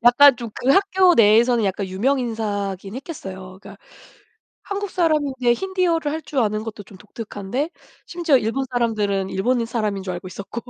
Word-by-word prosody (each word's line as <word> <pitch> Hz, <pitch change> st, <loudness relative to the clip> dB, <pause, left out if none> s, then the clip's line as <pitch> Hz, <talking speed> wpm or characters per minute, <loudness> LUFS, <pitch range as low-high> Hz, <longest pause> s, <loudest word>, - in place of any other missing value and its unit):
약간 250 Hz, +3 st, +7 dB
좀 235 Hz, -2 st, -7 dB
그 260 Hz, -, 0 dB
학교 380 Hz, +1 st, +4 dB
내에서는 230 Hz, +1 st, +4 dB
약간 195 Hz, 0 st, -1 dB
유명 230 Hz, +9 st, 0 dB
인사이긴 205 Hz, -4 st, -3 dB
했겠어요. 190 Hz, -, -8 dB
그니까 -, -, -13 dB, 0.8 s
한국 405 Hz, -1 st, -4 dB
사람인데 290 Hz, -8 st, +1 dB
힌디어를 355 Hz, -2 st, 0 dB
할 320 Hz, -, -4 dB
줄 290 Hz, -, -5 dB
아는 215 Hz, -1 st, 0 dB
것도 220 Hz, -2 st, -7 dB
좀 195 Hz, -1 st, -16 dB
독특한데 215 Hz, -, -5 dB, 0.4 s
심지어 340 Hz, -5 st, +2 dB
일본 250 Hz, +3 st, -1 dB
사람들은 210 Hz, -5 st, 0 dB
일본인 235 Hz, +4 st, 0 dB
사람인 215 Hz, -4 st, -2 dB
줄 185 Hz, -1 st, -4 dB
알고 175 Hz, +1 st, -7 dB
있었고. 200 Hz, +5 st, -7 dB
235 Hz, 375 characters per minute, -21 LUFS, 205-285 Hz, 0.8 s, 약간